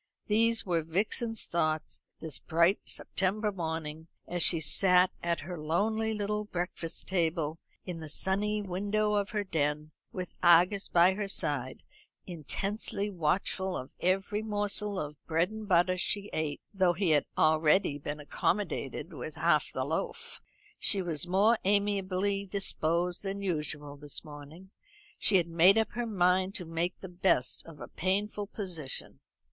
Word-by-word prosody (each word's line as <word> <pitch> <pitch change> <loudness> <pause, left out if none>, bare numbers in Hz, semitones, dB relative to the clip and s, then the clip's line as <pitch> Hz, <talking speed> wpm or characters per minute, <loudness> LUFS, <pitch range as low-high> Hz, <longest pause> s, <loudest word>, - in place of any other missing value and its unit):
These 230 +2 +2
were 170 -3 +1
Vixen's 215 +7 -1
thoughts 155 -2 -1
this 160 -4 -2
bright 170 +4 +2
September 210 +3 -1
morning, 160 -3 -4 0.2
as 175 0 -2
she 165 0 +5
sat 180 +3 +5
at 170 -1 -1
her 175 +1 -6
lonely 215 +8 0
little 210 0 -1
breakfast 175 -3 -5
table 165 -3 0 0.3
in 175 -3 -5
the 155 -1 -8
sunny 205 +6 +1
window 205 +3 0
of 205 -1 0
her 210 -2 -1
den, 150 -4 -1 0.2
with 180 -1 -6
Argus 180 +3 +5
by 175 +2 +5
her 205 +1 -3
side, 140 -9 -2 0.4
intensely 195 +5 -3
watchful 185 +2 0
of 130 - -8
every 195 +3 0
morsel 205 -1 -2
of 150 -1 -6
bread 165 +4 +1
and 220 -1 -7
butter 185 0 +3
she 200 +3 -1
ate, 150 -2 -2
though 185 -3 +3
he 180 -1 +1
had 145 -2 +3
already 155 0 +3
been 145 +1 -5
accommodated 185 +7 -2
with - - -6
half - - +2
the - - -2
loaf. - - -4 0.4
She 195 -4 +3
was 170 -1 -1
more 205 +6 +4
amiably 200 0 +1
disposed 175 -2 0
than 200 0 -4
usual 150 -5 -3
this 145 +2 -3
morning. 150 +5 -11 0.5
She 195 - +5
had 170 -2 +1
made 170 +5 +5
up 220 - +1
her 240 +2 -3
mind 185 -1 +2
to 180 - -4
make 165 +2 -2
the 190 - -6
best 175 -9 +1
of 165 -3 -12
a - - -7
painful 205 +3 -1
position. 175 -10 -5
180 Hz, 150 wpm, -30 LUFS, 160-200 Hz, 0.5 s, she